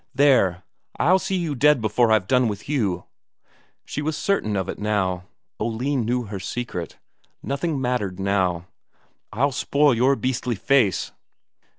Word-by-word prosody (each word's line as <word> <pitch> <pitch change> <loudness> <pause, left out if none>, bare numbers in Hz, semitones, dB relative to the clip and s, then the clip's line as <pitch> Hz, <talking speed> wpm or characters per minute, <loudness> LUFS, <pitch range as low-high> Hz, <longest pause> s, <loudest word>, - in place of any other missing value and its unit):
"There! 100 -11 +3 0.3
I'll 185 +6 +4
see 190 +1 -2
you 170 -5 -1
dead 150 +2 +4
before 115 +1 +2
I've 110 -4 +3
done 125 +2 +3
with 105 -2 -5
you." 105 - -1 0.8
She 150 - -4
was 150 0 -2
certain 150 - 0
of 95 -2 -1
it - - -5
now. 95 -4 -1 0.3
Oline 120 +3 -1
knew 125 +2 0
her 100 -3 -6
secret; 95 -3 -5 0.5
nothing 140 +2 -2
mattered 125 -8 -2
now. 95 -3 0 0.7
"I'll 140 +6 +1
spoil 140 +1 +2
your 130 +4 +3
beastly 125 -2 -2
face." 115 -2 +2
120 Hz, 145 wpm, -23 LUFS, 100-140 Hz, 0.8 s, I'll